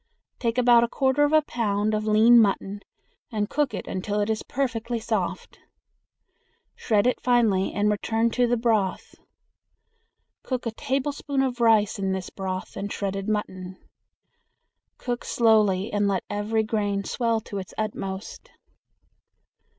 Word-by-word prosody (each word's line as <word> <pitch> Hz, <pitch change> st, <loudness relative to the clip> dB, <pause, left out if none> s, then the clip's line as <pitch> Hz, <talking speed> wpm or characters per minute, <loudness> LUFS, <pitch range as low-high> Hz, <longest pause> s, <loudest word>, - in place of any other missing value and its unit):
Take 230 Hz, 0 st, -1 dB
about 240 Hz, -1 st, +5 dB
a -, -, +1 dB
quarter 265 Hz, +3 st, +1 dB
of 290 Hz, -, 0 dB
a 310 Hz, -1 st, +5 dB
pound 215 Hz, -5 st, -1 dB
of 215 Hz, 0 st, -1 dB
lean 225 Hz, +3 st, +6 dB
mutton 200 Hz, -1 st, 0 dB, 0.5 s
and 210 Hz, -2 st, -2 dB
cook 295 Hz, -3 st, 0 dB
until 205 Hz, +3 st, -3 dB
it 205 Hz, +1 st, 0 dB
is 220 Hz, -, -2 dB
perfectly 240 Hz, -3 st, -2 dB
soft. 220 Hz, -, -3 dB, 1.2 s
Shred 210 Hz, -1 st, +1 dB
it 250 Hz, -, +1 dB
finely 225 Hz, -6 st, +2 dB
and 205 Hz, 0 st, +1 dB
return 225 Hz, +2 st, 0 dB
to 245 Hz, +1 st, +2 dB
the 245 Hz, 0 st, +1 dB
broth. 220 Hz, -5 st, 0 dB, 1.3 s
Cook 255 Hz, -2 st, -4 dB
a 230 Hz, -, -1 dB
tablespoonful 275 Hz, +2 st, -1 dB
of 245 Hz, -1 st, -6 dB
rice 220 Hz, -3 st, +3 dB
in 190 Hz, -1 st, -1 dB
this 190 Hz, -1 st, -5 dB
broth 185 Hz, -1 st, -5 dB
and 205 Hz, +1 st, -5 dB
shredded 195 Hz, 0 st, -3 dB
mutton. 185 Hz, -3 st, -3 dB, 1.2 s
Cook 245 Hz, -1 st, -4 dB
slowly 215 Hz, -3 st, +2 dB
and 205 Hz, -1 st, +1 dB
let 195 Hz, -2 st, 0 dB
every 210 Hz, +2 st, 0 dB
grain 205 Hz, -2 st, -1 dB
swell 230 Hz, +1 st, 0 dB
to 200 Hz, -1 st, -6 dB
its 185 Hz, -, -9 dB
utmost. 200 Hz, -2 st, -5 dB
220 Hz, 140 wpm, -25 LUFS, 200-240 Hz, 1.3 s, lean